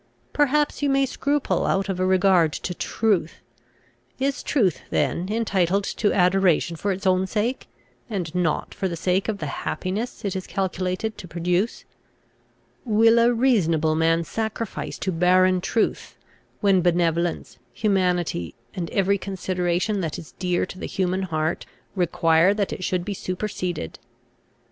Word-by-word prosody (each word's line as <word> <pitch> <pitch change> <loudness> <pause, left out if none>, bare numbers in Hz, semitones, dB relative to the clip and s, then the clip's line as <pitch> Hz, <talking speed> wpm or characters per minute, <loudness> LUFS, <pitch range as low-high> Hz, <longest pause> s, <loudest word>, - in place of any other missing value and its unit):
Perhaps 295 +1 +2
you 285 - +2
may 275 0 +3
scruple 285 +2 0
out 195 +1 +1
of 190 -2 -3
a 185 - +2
regard 185 -4 +4
to 180 - -4
truth. 190 -4 0 0.8
Is 275 +1 -1
truth 200 - +1
then 175 +2 0
entitled 200 -4 +1
to 205 +1 0
adoration 180 -2 +3
for 200 +5 -1
its 195 +1 -4
own 185 0 +3
sake, 225 +6 -2 0.4
and 180 -7 -3
not 175 -4 -1
for 190 - -2
the 170 - -3
sake 185 +5 0
of 215 - -1
the 160 - -5 0.2
happiness 200 +8 -3
it 195 - -2
is 185 - -4
calculated 190 +3 -2
to 185 - -8
produce? 180 +5 -1 1.0
Will 225 0 +4
a 235 +1 +5
reasonable 175 - +2
man 165 +1 +2
sacrifice 220 +4 -4
to 190 - -2
barren 185 +2 +3
truth, 220 +4 -1 0.4
when 195 -3 +4
benevolence, 170 -3 0
humanity, 180 - 0 0.2
and 170 -3 -4
every 200 0 +1
consideration 185 +1 -1
that 160 -3 -3
is 160 - -10
dear 180 -1 0
to 185 - -10
the - - -4
human 185 0 -1
heart, 160 -3 -2 0.3
require 170 +1 +3
that 205 -2 -1
it 185 - -6
should 180 -1 -1
be 205 - -2
superseded? 185 -2 -4
185 Hz, 145 wpm, -24 LUFS, 175-210 Hz, 1.0 s, a